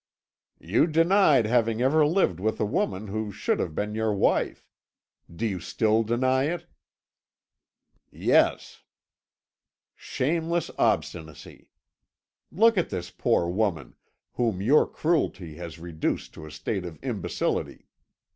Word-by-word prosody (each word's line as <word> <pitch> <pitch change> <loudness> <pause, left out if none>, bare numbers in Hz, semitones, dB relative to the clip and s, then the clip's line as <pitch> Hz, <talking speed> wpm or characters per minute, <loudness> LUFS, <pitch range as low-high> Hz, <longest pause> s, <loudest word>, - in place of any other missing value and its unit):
"You 100 - +2
denied 165 - +4
having 115 -1 +1
ever 140 +5 +3
lived 150 - +1
with 110 +3 -1
a - - +1
woman 135 - -1
who 110 +1 -3
should 105 +1 -1
have 80 -4 -3
been 105 +1 -2
your 110 0 0
wife. 100 - 0 0.6
Do 85 +7 -4
you 100 -4 -2
still 110 +5 +1
deny 130 +4 +1
it?" 170 +3 -3 1.4
"Yes." - - +1 1.1
"Shameless 165 +5 -2
obstinacy! 80 -2 -2 0.8
Look 225 0 +4
at 175 - -1
this 90 -1 -5
poor 85 - +1
woman, 90 - -1 0.4
whom 115 -6 -1
your 130 +10 +4
cruelty 95 - -1
has 85 -2 -8
reduced 80 -1 -3
to 80 - -10
a - - -11
state 90 +6 -3
of 85 -3 -8
imbecility. - - -3
110 Hz, 120 wpm, -26 LUFS, 90-150 Hz, 1.4 s, denied